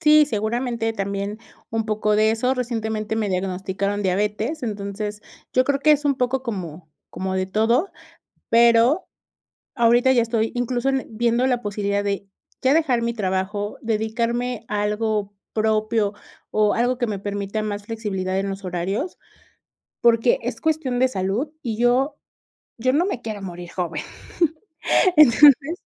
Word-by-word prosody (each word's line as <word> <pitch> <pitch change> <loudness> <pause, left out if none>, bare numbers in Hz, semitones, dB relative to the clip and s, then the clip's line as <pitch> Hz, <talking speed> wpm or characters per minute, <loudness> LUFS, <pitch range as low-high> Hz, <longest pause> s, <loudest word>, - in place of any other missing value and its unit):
Sí, 300 0 +6
seguramente 230 0 -1
también 200 +1 -3 0.3
un 225 -1 -1
poco 210 0 +1
de 215 +1 +4
eso. 250 +4 +1
Recientemente 220 -3 -2
me 215 -2 0
diagnosticaron 190 +2 -2
diabetes, 210 - -1
entonces, 210 -1 -4 0.3
yo 255 - +3
creo 280 0 0
que 305 - +4
es 295 0 +1
un 285 -1 +3
poco 255 +1 0
como 180 - -6 0.2
como 190 0 -3
de 185 0 0
todo, 230 - +1 0.6
pero, 235 +7 +5 0.7
ahorita 240 +2 +4
ya 240 -2 +4
estoy 225 -1 0
incluso, 245 +1 0
en 270 -1 0
viendo 235 +3 +1
la 245 -2 +1
posibilidad 205 -1 -1
de 200 0 -2 0.3
ya 260 +2 +4
dejar 280 -7 +2
mi 235 0 -1
trabajo, 205 0 -2
dedicarme 230 +2 -1
a 205 -1 -1
algo 210 -1 -1 0.2
propio, 215 -1 +1 0.4
o 210 -1 +3
algo 245 +1 +1
que 240 -2 -1
me 205 - -2
permita 205 +1 -3
más 205 -1 -4
flexibilidad 195 -4 -3
en 195 0 -2
los 195 0 -6
horarios, 190 - -3 0.8
porque 235 - +4
es - - -4
cuestión 305 -6 0
de 260 - +4
salud, 200 +6 -2
y 225 -3 -3
yo 250 +4 +2 0.6
yo 255 +3 +1
no 310 +6 +3
me 320 - -3
quiero 215 -4 -6
morir 175 -2 -7
joven, 170 -4 -3 1.2
entonces. 295 +2 +6
220 Hz, 150 wpm, -22 LUFS, 205-245 Hz, 1.2 s, Sí